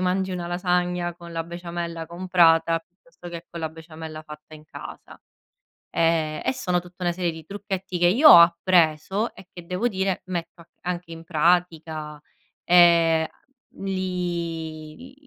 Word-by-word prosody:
mangi 185 +1 0
una 175 -1 -4
lasagna 180 -1 -1
con 170 0 -12
la 165 0 -3
besciamella 170 -1 -6
comprata, 170 -2 +3
piuttosto 180 +2 -15
che 170 0 -8
con 170 - -7
la 160 - -2
besciamella 160 -1 -10
fatta 150 0 -13
in 150 - -14
casa, - - -11 0.8
ehm, 160 -2 +1
e 130 - 0
sono 180 +4 0
tutta 180 +1 -11
una 175 - +2
serie 175 -1 -1
di 160 -1 -11
trucchetti 195 -1 -5
che 175 - +3
io 265 - +7
ho - - +11
appreso 170 +3 +3
e 185 - -14
che 175 -1 -11
devo 180 +7 -1
dire 190 -3 -1
metto 175 -2 -5
a - - -16
c - - -49
anche 175 -1 -4
in 165 0 -9
pratica, 160 -2 0 0.4
ehm, 170 -2 +5 0.6
li 175 0 -4
170 Hz, 155 wpm, -24 LUFS, 165-180 Hz, 0.8 s, ho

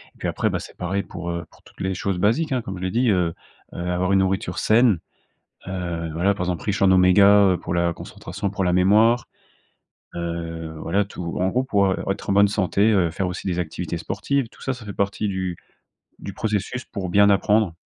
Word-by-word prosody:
Et - - -22
puis - - -2
après, - - 0
bah, - - -2
c'est - - -11
pareil 95 +2 -2
pour, 90 -1 -7
heu, 85 -1 -4
pour - - -22
toutes - - -15
les 95 0 -1
choses 95 0 -2
basiques, 115 - +1
hein, 125 - 0
comme 95 -4 -6
je 90 - -7
l'ai 95 - -1
dit, 120 +3 +2
heu 90 -4 +1 0.4
heu, - - -9
avoir 90 +2 0
une 95 - +5
nourriture 95 -1 -1
saine. 110 -5 +4 0.7
Heu, 85 -3 -4
voilà, 95 +5 +1
par 95 - -4
exemple, 90 -2 -3
riche 100 -1 -1
en 95 - +6
oméga, 100 +1 +6
heu, 90 - -1
pour - - -5
la 85 0 +1
concentration, 100 +3 -6
pour 100 -1 -2
la 90 - +2
mémoire. 110 +6 +4 0.9
Heu, 85 -1 -4
voilà 100 +5 +1
tout 90 -4 -6
en 90 - +1
gros 125 +4 +1
pour, 100 -6 +2
heu, 95 - 0
être 100 +1 -3
en - - +3
bonne 100 +1 +5
santé, 100 +2 +2
heu, 90 -5 +2
faire 95 +2 -2
aussi 90 - -6
des 90 -1 -1
activités 85 +1 -4
sportives. 135 +9 -2
Tout - - -21
ça, 135 - -1
ça 120 - -12
fait 105 - -6
partie 100 +2 -1
du 95 -2 -2 0.6
du 100 - -8
processus 110 +4 -2
pour 95 -3 -5
bien 100 +3 +5
apprendre. 105 -2 +2
95 Hz, 220 wpm, -23 LUFS, 90-105 Hz, 0.9 s, en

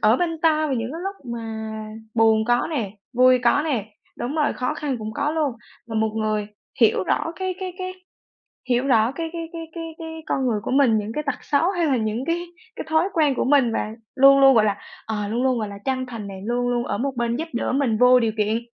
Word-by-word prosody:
ở 215 +3 +5
bên 330 +1 -1
ta 310 -1 +3
vào 275 - -1
những 230 -1 -2
cái 330 - -6
lúc 390 0 -4 0.2
mà 235 - -5 0.7
buồn 220 -1 +4
có 240 +1 +2
nè, 235 -10 -2 0.2
vui 255 +1 +5
có 285 +5 +4
nè, 255 -10 -1 0.3
đúng 255 +5 -3
rồi, 300 -2 +1
khó 250 - -2
khăn 280 -4 -2
cũng 215 0 -5
có 285 +4 0
luôn. 305 -4 0 0.3
Là 225 - -7
một 220 0 +1
người 215 -1 0 0.3
hiểu 215 -4 +4
rõ 330 - 0
cái 375 -1 -2
cái 370 -1 -4
cái 370 0 -4 0.8
hiểu 250 +2 +2
rõ 230 -1 +4
cái 325 +3 -4
cái 330 -1 -5
cái 330 - -5
cái 330 - -4
cái 320 0 -7
con 265 -1 0
người 215 -3 +1
của - - -3
mình, 260 -5 +4
những 210 +1 -3
cái 300 - -2
tật 285 - -3
xấu 305 +5 +2
hay 350 -3 0
là 270 -4 +2
những 220 +3 -2
cái 345 +2 -1 0.3
cái - - -6
thói 320 +5 +2
quen 300 -4 +3
của - - 0
mình, 265 -4 +4
và 215 - -2 0.2
luôn 275 +1 +7
luôn, 270 0 +7
gọi 215 - +5
là, 205 -2 0 0.3
ờ, 210 -2 -3
luôn 235 +5 -1
luôn, 255 -3 +2
gọi 215 - -2
là, 200 - -8
chân 260 -1 -1
thành 230 -5 -7
này, 190 -1 -8
luôn 245 +1 0
luôn 240 0 0
ở - - -2
một 275 +2 -1
bên 235 0 0
giúp 320 +4 -3
đỡ 235 - -1
mình 255 -5 +1
vô 250 +1 +6
điều 225 -2 +1
kiện. 215 +2 +1
255 Hz, 245 wpm, -23 LUFS, 225-305 Hz, 0.8 s, luôn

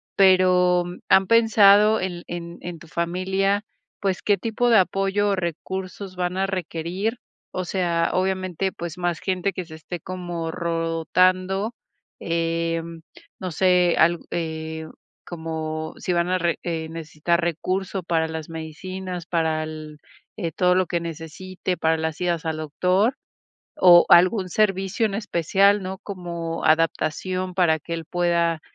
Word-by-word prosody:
pero, 185 -2 +5 0.3
¿han 190 - +6
pensado 215 -1 +6
en 175 -2 -4
en 170 0 -7
en 175 -1 -6
tu 165 - -15
familia, 190 +5 0 0.3
pues 195 -2 -1
qué 205 -1 +2
tipo 230 +5 0
de 230 - +6
apoyo 195 +2 +1
o 200 - +2
recursos 185 +2 -5
van 180 0 -2
a 190 - +1
requerir?, 185 +4 -3 0.3
o 185 - -4
sea, 170 -2 0
obviamente, 185 0 -1
pues 170 -1 -7
más 175 -2 -1
gente 185 0 -1
que 185 -2 -5
se 160 - -13
esté 160 +2 -7
como 175 -1 -5
rotando, 180 +5 +1 0.5
eh, 165 0 0 0.6
no 185 -1 -4
sé, 180 +1 +3
al 170 0 +4
eh, 160 -1 -4 0.4
como 160 -2 -5
si 180 - -2
van 170 0 +1
a 185 - +2
re 170 -1 0
eh 165 -2 -3
necesitar 165 +1 -1
recursos 185 +3 -2
para 160 -1 +1
las 160 -1 -6
medicinas, 175 +3 -6
para 160 -2 0
él, 155 -1 -8 0.4
eh, 170 -5 -3
todo 180 +2 +3
lo 185 0 +3
que 170 - -1
necesite, 170 +3 -5
para 160 0 +2
las 160 -1 -3
idas 170 -2 -1
al 160 -1 -2
doctor 180 - +1 0.6
o 175 -1 +7
algún 185 +2 +5
servicio 195 +2 +1
en 200 - -4
especial, 200 0 +2
¿no?, 190 +1 -5
como 170 -4 -5
adaptación 165 +3 +1
para 170 -4 +3
que 170 +3 -5
él 165 -1 -5
pueda 170 -1 +1
175 Hz, 145 wpm, -23 LUFS, 165-190 Hz, 0.6 s, o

